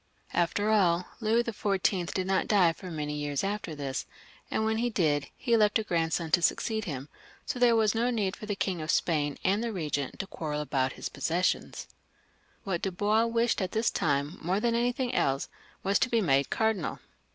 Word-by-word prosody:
After 205 +5 +1
all, 180 -4 +3
Louis 230 +1 +2
XV. 195 -5 0
did 185 - -1
not 190 0 +1
die 185 -6 +4
for 185 +2 -9
many 150 -3 -3
years 145 0 -2
after 195 -5 -3
this, 135 -3 -4 0.4
and 220 - 0
when 220 0 +1
he 240 +1 +1
did, 150 -9 +1
he 235 -3 +2
left 210 -2 +4
a 220 - -1
grandson 165 -3 -1
to 175 - +4
succeed 220 +5 +1
him, 140 -5 -5 0.4
so 250 - -3
there 240 -1 +5
was 220 -2 +3
no 235 +2 +1
need 210 -6 0
for 210 - -9
the 205 - -1
King 185 -4 -2
of 155 - -6
Spain 150 -5 +1
and 200 +4 +2
the - - -1
Eegent 150 - -3
to 195 - -3
quarrel 150 -5 -4
about 135 -3 0
his - - -5
possessions. 175 +3 -1 0.8
What 190 -6 -2
Dubois 205 +4 +1
wished 230 -1 +1
at 185 0 -2
this 220 +1 +2
time, 145 +2 0
more 180 +4 0
than 235 +1 +1
anything 245 +2 0
else, 135 - +1 0.3
was 195 +1 +2
to 255 - +2
be 235 - +2
made 140 -8 +2
cardinal. 220 -6 0
190 Hz, 195 wpm, -29 LUFS, 160-220 Hz, 0.8 s, there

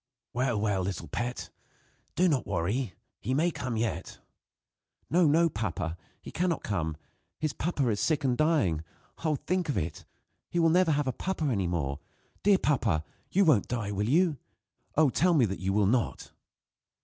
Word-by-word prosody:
"Well, 125 -3 +1
well, 100 -2 +1
little 95 +1 -3
pet, 120 +1 -4 0.6
do 180 +4 +4
not 145 -7 +1
worry. 100 +4 -1 0.2
He 130 +5 -1
may 170 +5 +2
come 125 -7 -3
yet." 115 0 -2 0.9
"No, 175 -1 +5
no, 165 +3 +4
papa, 95 - -3 0.3
he - - -8
cannot 175 -2 0
come. 80 -6 -2 0.4
His 155 -2 -1
papa 145 -5 -1
is 105 -2 0
sick, 150 -3 +1
and 130 -2 +2
is - - -3
dying! 145 - +2 0.4
Oh! 155 -2 +2
think 180 +2 -1
of 145 - 0
it! 80 - -3 0.4
He - - -3
will 165 -1 +5
never 180 -2 +4
have 145 0 +1
a 130 - -1
papa 190 -4 -2
any 100 -10 +1
more. 70 -5 -2 0.4
Dear 200 -1 +5
papa! 115 - +1 0.3
you 195 +1 +3
won't 140 - +4
die, 115 -4 -2
will 105 +2 -1
you? 165 +1 +3 0.6
Oh, 150 -3 +4
tell 175 +4 +3
me 130 -6 +5
that 95 -2 -4
you 95 +1 -1
will 105 +1 +3
not!" 115 +3 0
130 Hz, 175 wpm, -29 LUFS, 100-160 Hz, 0.9 s, No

